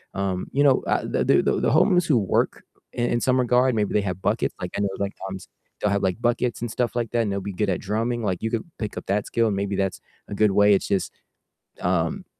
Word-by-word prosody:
Um, 95 -2 -2
you 140 +1 +3
know, 135 -2 +4
uh, - - +1
the - - -1
the - - +3
the - - +2
homeless 180 -2 +4
who 140 -6 +4
work 100 - 0 0.3
in 120 0 0
in 120 - +1
some 130 0 +2
regard, 125 0 +3
maybe 105 -2 0
they 105 - +3
have 95 -1 -4
buckets, - - 0
like - - -4
I - - -1
know, 100 - +1
like, 100 0 -2
sometimes 95 0 -7 0.3
they'll 105 - +1
have, 100 0 0
like, 95 +5 -1
buckets 120 -1 0
and 120 -2 -3
stuff 125 0 -1
like 120 -2 -1
that 120 -1 +1
and 100 - -2
they'll 100 0 -2
be 100 - -5
good 105 +2 -1
at 90 - -1
drumming, 115 +3 -1
like 95 -4 -1
you 110 - -1
could 115 -2 -1 0.2
pick 105 -2 -4
up - - -6
that 100 +1 0
skill 115 -1 +1
and 105 - 0
maybe 100 0 -2
that's 95 -1 -1 0.3
a - - -5
good 105 -1 +3
way. 105 +1 +5
It's - - -1
just, 100 -3 0 0.7
um, - - 0
105 Hz, 255 wpm, -24 LUFS, 100-120 Hz, 0.7 s, way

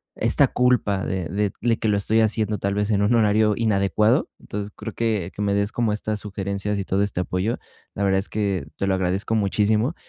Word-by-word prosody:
esta - - +3
culpa 120 -6 +1
de 95 -3 -3
de 100 0 -1
le 115 -1 +2
que 110 - -1
lo 105 - +3
estoy 110 +3 +2
haciendo 110 -1 +1
tal 100 0 -1
vez 105 +1 0
en 100 - +2
un 110 +4 +3
horario 110 -1 +3
inadecuado, 110 - +2
entonces, 105 0 -5
creo - - -7
que 110 -6 -1
que 105 - -6
me 100 -1 +1
des 100 +1 0
como 115 -3 0
estas 105 0 -2
sugerencias 100 0 -3
y 100 - -2
todo 95 +1 0
este 100 -3 -1
apoyo, 90 +6 -1 0.4
la 100 - -2
verdad 95 -1 +3
es 100 - -3
que 100 -7 -1
te 100 - -2
lo 95 -1 +2
agradezco 95 +4 -1
muchísimo 105 - +1
105 Hz, 215 wpm, -23 LUFS, 100-110 Hz, 0.4 s, esta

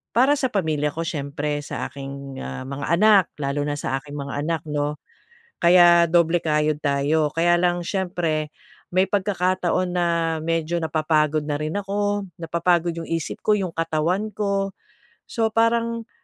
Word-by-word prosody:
para 260 +5 +5
sa 260 - +1
pamilya 155 -7 0
ko 165 +3 -4
siyempre, 145 -2 -3
sa - - -4
aking, 140 0 -8
ah, 130 - -6
mga 140 +1 -5
anak, 210 -3 +6 0.2
lalo 140 +1 -1
na 145 - -1
sa 135 -1 -2
aking 145 +1 -10
mga 140 0 -4
anak 165 -2 -1
'no? 150 0 -1 0.6
Kaya 175 -1 +6
doble 170 0 +3
kayod 150 -1 +1
tayo. 145 +2 +2
Kaya 175 +1 +3
lang 175 0 +1
siyempre, 175 -5 -1 0.4
may 185 +2 +3
pagkakataon 185 -2 0
na 175 -1 +2 0.4
medyo 165 0 -1
napapagod 155 -1 +1
na 145 - -1
rin 155 0 -3
ako, 205 0 -1 0.2
napapagod 170 +1 +1
yung 165 -1 -6
isip 165 -2 -3
ko, 210 - +2
yung 190 -4 -2
katawan 165 +5 0
ko. 200 -1 -1 0.5
So, 225 -2 0
parang 230 0 +1
165 Hz, 150 wpm, -23 LUFS, 150-190 Hz, 0.6 s, anak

